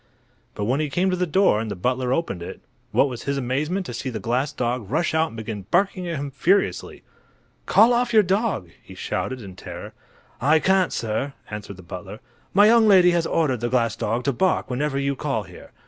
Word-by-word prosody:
But 105 - -2
when 130 +6 +1
he 155 -1 -1
came 185 +6 +1
to - - +1
the 180 0 -1
door 185 - +3
and 110 0 -3
the 100 - -4
butler 125 +6 -1
opened 130 - -1
it, 85 - -7 0.3
what - - +3
was 125 -3 -7
his 140 0 -1
amazement 150 +9 -1
to 120 - -6
see 125 +3 -4
the 115 -3 -4
glass 125 +7 -1
dog 120 -4 -3
rush 155 +5 0
out 160 0 +2
and 115 - -11
begin 110 -3 -6
barking 185 0 +1
at 170 - -2
him 140 -1 -4
furiously. 185 +9 0 0.6
"Call 230 +3 +6
off 240 0 +1
your 220 -2 +6
dog," 190 - -1
he - - -13
shouted, 130 -3 -3
in 95 -2 -10
terror. - - -9 0.5
"I 150 +5 +4
can't, 190 +2 +2
sir," 115 +5 -2 0.2
answered 105 -2 -7
the 95 - -12
butler. 85 - -8 0.3
"My 205 +2 +6
young 225 0 +6
lady 185 -3 +6
has 170 -1 +1
ordered 140 -7 +1
the 120 +1 -2
glass 115 -3 +1
dog 115 +4 -2
to 140 - 0
bark 185 +1 0
whenever 135 +2 -1
you 140 0 0
call 135 -6 -2
here. 90 -2 -14
140 Hz, 215 wpm, -23 LUFS, 115-180 Hz, 0.6 s, Call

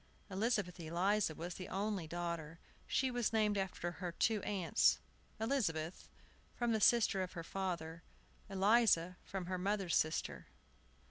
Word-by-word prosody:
Elizabeth 200 -3 0
Eliza 175 +2 +1
was 170 +3 -5
the 185 - -7
only 195 -3 -2
daughter. 170 -1 -4 0.3
She 265 -1 +1
was 240 -2 0
named 215 -2 +2
after 190 -3 -2
her 175 0 -5
two 215 +3 +2
aunts, 190 -5 +3 0.4
Elizabeth, 195 - -1 0.5
from 240 -1 0
the 220 -1 +1
sister 215 -4 +4
of 185 - -4
her 170 -2 -5
father; 170 -3 -3 0.5
Eliza, 195 -3 +4
from 190 -2 -5
her 185 0 -2
mother's 195 -2 0
sister. 155 +1 0
190 Hz, 135 wpm, -36 LUFS, 170-210 Hz, 0.5 s, sister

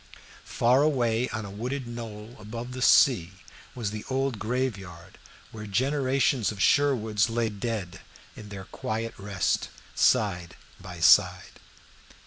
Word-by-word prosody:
Far 125 +3 +3
away 125 -5 +1
on 110 -2 -4
a 100 - -8
wooded 125 +6 -4
knoll 115 -1 -8
above 115 +4 -7
the 130 0 -6
sea 95 -9 +4 0.4
was 115 -5 -3
the 105 0 -6
old 135 -3 -1
graveyard, 100 -8 -4 0.3
where 105 -1 -8
generations 130 +1 +1
of 105 - -9
Sherwoods 115 -6 +2
lay 115 0 0
dead 105 -4 -5 0.3
in 105 -1 -11
their 95 -2 -8
quiet 115 +3 -4
rest, 100 -2 -1 0.2
side 90 -5 +1 0.2
by 90 -2 -10
side. - - +4
110 Hz, 125 wpm, -27 LUFS, 100-125 Hz, 0.4 s, sea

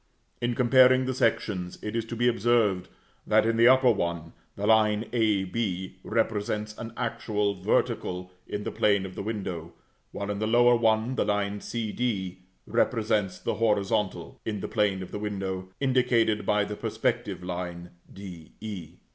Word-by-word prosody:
In 120 0 0
comparing 130 +1 +5
the 130 - -1
sections 100 -7 0
it 105 +1 -4
is 115 -1 -1
to 115 - -6
be 120 +1 +2
observed 115 -5 +2 0.4
that, - - +4
in 115 0 +2
the 115 +1 +6
upper 130 -1 +6
one, 85 -5 -2 0.2
the 100 - -3
line 110 0 +3
a 110 -5 +2
b 95 -2 -3
represents 105 -1 -1
an 115 0 -6
actual 110 -4 -1
vertical 90 0 0 0.2
in 105 - -4
the - - -3
plane 100 -2 +2
of 95 - -7
the - - -5
window; 95 -6 -4 0.4
while, 100 0 -4
in 100 - -3
the 110 - 0
lower 120 +2 +5
one, 110 +1 +2
the - - 0
line 105 0 -1
c 115 -3 -3
d 95 -7 -2 0.3
represents 105 -5 +1
the - - -2
horizontal, 105 -2 0
in 105 -2 -3
the - - -3
plane 100 -4 0
of - - -10
the - - -4
window, 95 -3 -4
indicated 125 -5 +2
by 105 0 +3
the 105 +1 -4
perspective 90 - -2
line 90 -1 -5 0.2
d 90 -5 -10
e. 100 -7 -7
105 Hz, 165 wpm, -27 LUFS, 95-115 Hz, 0.4 s, the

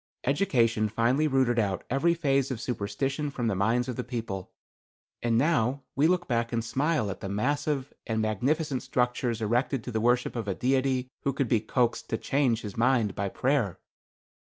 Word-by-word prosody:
Education 120 - +2
finally 120 +8 +2
rooted 130 -4 +2
out 100 -4 0
every 165 +7 +2
phase 140 -5 +1
of 130 -4 -3
superstition 135 +6 -2
from 125 -3 -3
the 110 - +1
minds 115 +6 +1
of 125 - -4
the - - -2
people, 110 -6 -5 0.7
and 115 -1 +1
now 135 -2 +2
we 145 +3 +4
look 175 0 +1
back 115 -2 0
and 115 -1 -1
smile 140 -3 0
at 95 - -7
the 95 - -5
massive 140 +6 -1
and 110 -1 0
magnificent 130 - 0
structures 125 -2 -1
erected 120 +3 0
to 125 - -5
the 110 -1 -1
worship 125 +2 +2
of 115 -3 -3
a 95 - -1
Deity 130 0 +1
who 140 - 0
could 135 -1 -1
be 115 -1 +3
coaxed 120 +2 0
to 110 - 0
change 120 0 +1
his 105 -3 -6
mind 115 -3 +2
by 100 0 -2
prayer." 125 - 0
125 Hz, 180 wpm, -28 LUFS, 110-135 Hz, 0.7 s, we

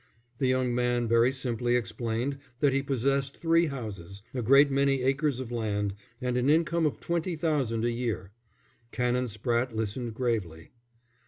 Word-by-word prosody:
The 130 - +2
young 130 -1 +1
man 120 -1 +1
very 115 +2 +4
simply 120 -2 -1
explained 120 +3 -2 0.2
that 140 -2 +3
he 135 - +2
possessed 135 +1 0
three 165 0 +3
houses, 100 - -7
a 125 - -2
great 140 +5 +6
many 135 -1 +2
acres 135 0 +1
of 125 -2 -6
land, 105 -4 -1 0.3
and 125 -1 -1
an 125 +3 +2
income 165 +1 +3
of 150 - -4
twenty 170 +1 -1
thousand 140 -9 0
a 120 - +1
year. 115 -5 -3 0.6
Canon 125 0 0
Spratte 120 +2 -1
listened 110 +2 -3
gravely. 105 -10 -2
125 Hz, 155 wpm, -28 LUFS, 115-140 Hz, 0.6 s, great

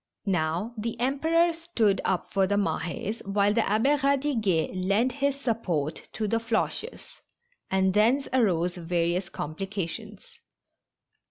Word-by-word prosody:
Now, 180 +3 0
the 230 +1 -4
Emperor 320 +7 +2
stood 240 - 0
up 185 -2 -1
for 195 -1 +3
the 200 - +1
Mah^s, 200 +2 -2
while 200 +1 +2
the 230 - +3
Abb^ 225 +9 +2
Eadiguet 265 - +1
lent 200 +7 +1
his 280 +1 -1
support 180 - -2
to 215 -1 -2
the 230 - +1
Floches, 230 - -3 0.5
and 190 0 +2
thence 235 +7 +3
arose 180 -7 +2
various 175 +1 -1
complications. 195 +5 -6
210 Hz, 120 wpm, -27 LUFS, 185-250 Hz, 0.5 s, for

